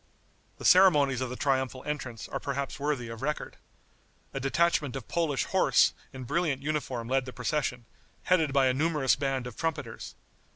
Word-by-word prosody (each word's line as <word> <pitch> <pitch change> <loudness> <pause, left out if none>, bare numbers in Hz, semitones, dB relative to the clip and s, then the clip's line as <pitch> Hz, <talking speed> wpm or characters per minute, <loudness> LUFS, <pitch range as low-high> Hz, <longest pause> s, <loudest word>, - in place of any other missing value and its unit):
The - - -8
ceremonies 145 -9 +5
of 130 - -2
the 125 - -5
triumphal 130 -1 -1
entrance 130 -6 -5
are - - -4
perhaps 140 +1 -4
worthy 140 -4 -1
of 115 -1 -8
record. 150 +2 -3 0.8
A 135 - -3
detachment 145 0 +1
of 135 -4 -6
Polish 160 -6 0
horse - - +3 0.2
in 130 -1 -8
brilliant 145 0 -1
uniform 140 -6 -2
led 130 +1 +1
the 130 - -8
procession, 125 -2 -2 0.4
headed 165 -5 +2
by 135 -1 +3
a 130 - +3
numerous 150 -1 +2
band 135 -2 -2
of 125 -3 -7
trumpeters. 165 -1 -4
135 Hz, 165 wpm, -29 LUFS, 130-150 Hz, 0.8 s, ceremonies